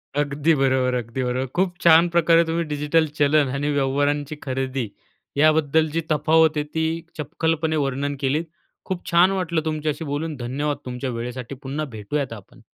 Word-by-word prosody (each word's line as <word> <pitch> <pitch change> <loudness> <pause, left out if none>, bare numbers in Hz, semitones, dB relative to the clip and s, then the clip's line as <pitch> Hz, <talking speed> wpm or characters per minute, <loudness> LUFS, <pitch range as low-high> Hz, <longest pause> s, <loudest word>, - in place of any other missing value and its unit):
अगदी 145 +2 +1
बरोबर, 130 -2 +2
अगदी 120 +1 -3
बरोबर. 125 +1 -1
खूप 180 0 +1
छान 170 0 +6
प्रकारे 170 0 +4
तुम्ही 165 +1 -1
डिजिटल 150 +2 +1
चलन 145 0 +4
आणि 145 +2 -1
व्यवहारांची 145 +1 0
खरेदी 130 -2 -2 0.5
याबद्दल 155 +1 +3
जी 165 - 0
तफावत 155 +1 +3
आहे 150 - +1
ती 160 0 +1 0.3
चपखलपणे 160 +1 -1
वर्णन 140 +2 -2
केलीत. 145 +4 0 0.4
खूप 185 -2 -4
छान 175 +2 +5
वाटलं 175 -4 -1
तुमच्याशी 155 0 -2
बोलून. 150 +2 -3
धन्यवाद 140 +4 -2
तुमच्या 125 +1 -4
वेळेसाठी. 125 +2 -5
पुन्हा 140 +3 -4
भेटूयात 125 +5 -3
आपण. 105 -4 -13
145 Hz, 150 wpm, -23 LUFS, 135-160 Hz, 0.5 s, छान